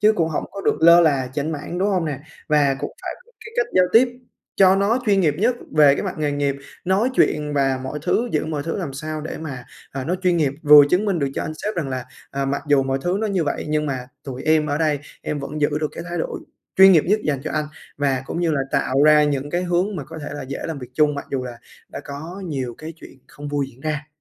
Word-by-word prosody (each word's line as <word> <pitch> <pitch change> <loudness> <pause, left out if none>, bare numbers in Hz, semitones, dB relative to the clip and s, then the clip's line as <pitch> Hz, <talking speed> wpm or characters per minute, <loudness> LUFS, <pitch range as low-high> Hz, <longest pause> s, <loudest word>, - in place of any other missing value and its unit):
chứ 215 +1 +5
cũng 165 -6 0
hổng 155 - -2
có 200 - -7
được - - +1
lơ 170 +1 +8
là 140 -6 +2
chểnh 150 +3 -2
mảng, 160 +4 -5
đúng 195 - +1
hông 185 -4 +1
nè? 145 -3 -4 0.3
Và 145 -3 +3
cũng - - -4
phải - - -4
có 480 - -25
cái 440 - -10
cách - - +2
giao 185 - +6
tiếp 245 +3 +6 0.5
cho 190 -1 +6
nó 205 +5 +2
chuyên 200 -2 +4
nghiệp 150 -5 +2
nhất 235 +5 +2 0.2
về 145 -2 +7
cái - - -3
mặt 190 - -3
nghề 150 -1 0
nghiệp, 140 -1 0 0.3
nói 200 +8 +2
chuyện 150 -9 +1
và 135 -2 +1
mọi 140 +3 -4
thứ, 240 +9 +1
giữ 155 - +1
mọi 150 -2 -3
thứ 165 - -3
làm 170 -9 -4
sao 155 +2 -5
để 155 - -6
mà, 135 -6 -7 0.3
à, 135 -1 -4
nó 175 - 0
chuyên 180 -1 +3
nghiệp 145 -5 +1
vừa 150 -1 +9
chứng 185 +4 +2
minh 195 -5 0
được 140 -2 0
cho - - -2
anh - - -4
sếp 210 +6 -4
rằng 165 -6 -2
là, 130 -1 -4 0.3
ờ, 135 0 -2
mặc 140 +1 -2
dù 140 -2 +4
mọi 135 0 -1
thứ 180 +2 0
nó 220 - 0
như 190 -6 0
vậy 145 - -2
nhưng 150 0 0
mà 130 -3 -3 0.2
tụi 130 -2 -6
em 155 -1 +3
ở 145 0 -1
đây, 155 -3 +1 0.2
em 150 - -3
vẫn 150 +2 -5
giữ 145 - +3
được 155 - 0
cái 165 - -7
thái 175 0 -3
độ - - -3 0.4
chuyên 190 0 +9
nghiệp 160 - +5
nhất 210 +3 +2
dành 140 -3 0
cho - - -3
anh 155 0 0 0.3
và 135 -2 0
cũng 170 - -3
như 170 -2 +1
là 150 -3 +1
tạo 135 +2 +2
ra 150 0 +6
những 145 -1 -1
cái 175 +2 0
hướng 180 +3 0
mà 145 - -5
có 160 +1 -9
thể - - -5
là 145 - -5
dễ 135 +1 -6
làm 160 -3 -4
việc 125 -2 -9
chung 150 0 +3
mặc 140 - -6
dù 130 -2 -2
là 120 -1 -8 0.3
đã - - -7
có 160 +7 -7
nhiều 130 -6 -3
cái 160 +1 -7
chuyện 135 - -14
không 145 0 -9
vui 145 -1 -1
diễn 125 - -21
ra. 150 0 -3
150 Hz, 275 wpm, -22 LUFS, 140-175 Hz, 0.5 s, vừa